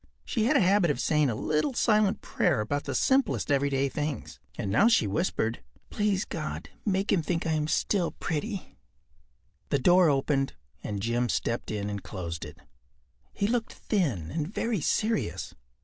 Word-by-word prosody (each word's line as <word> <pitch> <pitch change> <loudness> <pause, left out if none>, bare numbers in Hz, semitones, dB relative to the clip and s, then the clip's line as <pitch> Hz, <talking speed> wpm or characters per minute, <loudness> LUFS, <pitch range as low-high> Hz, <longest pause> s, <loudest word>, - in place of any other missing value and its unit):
She 220 -2 0
had 285 +5 +4
a - - +4
habit 190 -1 +4
of 145 - 0
saying 150 -2 +2
a 115 - -1
little 155 - 0
silent 215 -4 +3
prayer 165 -9 +1
about 145 +7 -2
the - - -3
simplest 265 - +2
everyday 140 -1 +2
things, 145 -2 -4 0.2
and 95 - -2
now 120 - +5
she 225 - +4
whispered: 115 - -1 0.3
“Please 205 -3 0
God, - - -5
make 195 -1 0
him 190 - +3
think 165 +1 -2
I 165 - 0
am 155 -1 0
still 175 +2 +1
pretty.” 195 +6 -4 0.9
The - - +2
door 175 +5 +5
opened 135 -1 +1 0.3
and 100 -2 -4
Jim 120 +1 0
stepped 115 - -1
in 105 -2 -2
and 100 -1 -4
closed 85 -4 -5
it. - - -11 0.7
He 200 - -1
looked 230 +1 0
thin 130 - -1
and 160 +2 -3
very 225 -4 -1
serious. 210 - -1
155 Hz, 165 wpm, -28 LUFS, 120-200 Hz, 0.9 s, now